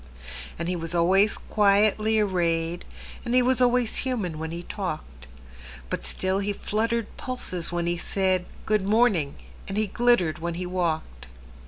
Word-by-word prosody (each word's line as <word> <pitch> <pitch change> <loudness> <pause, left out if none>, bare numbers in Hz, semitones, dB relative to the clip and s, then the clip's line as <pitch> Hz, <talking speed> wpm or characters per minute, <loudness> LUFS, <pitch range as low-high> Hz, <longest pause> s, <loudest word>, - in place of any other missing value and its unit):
And 170 - -3
he 180 - -1
was 165 0 -4
always 190 +5 +4
quietly 215 +1 +3
arrayed, 175 -4 0 0.4
And 240 +1 -1
he 255 - +5
was 255 0 +2
always 245 -2 +3
human 210 - -2
when 160 0 -4
he 170 +1 -6
talked; 155 - -6 0.6
But - - -2
still 190 - 0
he 200 +1 -1
fluttered 225 +2 -2
pulses 185 -10 -4
when 175 0 -1
he 175 0 0
said,"Good 190 +3 0
morning," 200 -8 +2 0.3
and 195 - -4
he 215 - +2
glittered 210 -6 +2
when 170 +1 -3
he 180 +1 -4
walked. 160 - -2
185 Hz, 150 wpm, -26 LUFS, 170-215 Hz, 0.6 s, he